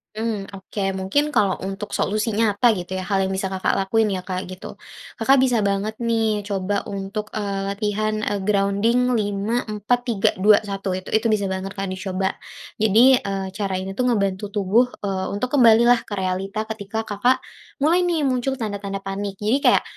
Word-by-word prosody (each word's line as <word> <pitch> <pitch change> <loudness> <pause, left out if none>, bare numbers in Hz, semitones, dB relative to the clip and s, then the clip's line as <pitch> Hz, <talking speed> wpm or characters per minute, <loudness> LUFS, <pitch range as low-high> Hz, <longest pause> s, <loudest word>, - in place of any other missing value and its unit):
Mmm, 215 -3 -3
oke 195 +2 -8 0.2
mungkin 190 +11 +1
kalau 195 -3 +2
untuk 195 +2 -5
solusinya 215 0 0
nyata 235 +3 +5
gitu 185 -2 -4
ya 185 - -3
hal 195 +2 0
yang - - -3
bisa 190 0 -2
Kakak 190 -1 0
lakuin 220 +3 +2
ya 185 - -5
Kak 185 0 -4
gitu, 185 0 -9 0.4
Kakak 265 +4 +5
bisa 245 -3 +2
banget 200 +1 0
nih 225 -2 +1
coba 200 0 -2
untuk, 200 +2 -4
eee, 200 -2 -2
latihan, 215 +1 -1
eee, 205 -1 -1
grounding 210 +5 +2
5-4-3-2-1 210 -2 +1
itu 185 - -7
itu 220 +1 +2
bisa 205 -3 +1
banget 190 +1 -4
Kak 195 -1 -3
dicoba. 190 0 -2 0.5
Jadi, 230 +5 +6
eee, 195 -1 -3
cara 195 0 -3
ini 190 +1 -3
tuh 250 +6 -1
ngebantu 200 -4 0
tubuh, 210 +5 +3 0.2
eee, 190 -2 -1
untuk 250 +4 -2
kembalilah 240 -2 +6
ke 205 - -4
realita 195 +3 -2
ketika 220 0 -4
Kakak, 220 +4 +1 0.4
mulai 340 +4 +4
nih 330 -4 0
muncul 265 0 0
tanda-tanda 200 -4 -4
panik. 195 0 -4
Jadi 215 +6 +1
kayak - - +5
205 Hz, 165 wpm, -22 LUFS, 195-225 Hz, 0.5 s, Jadi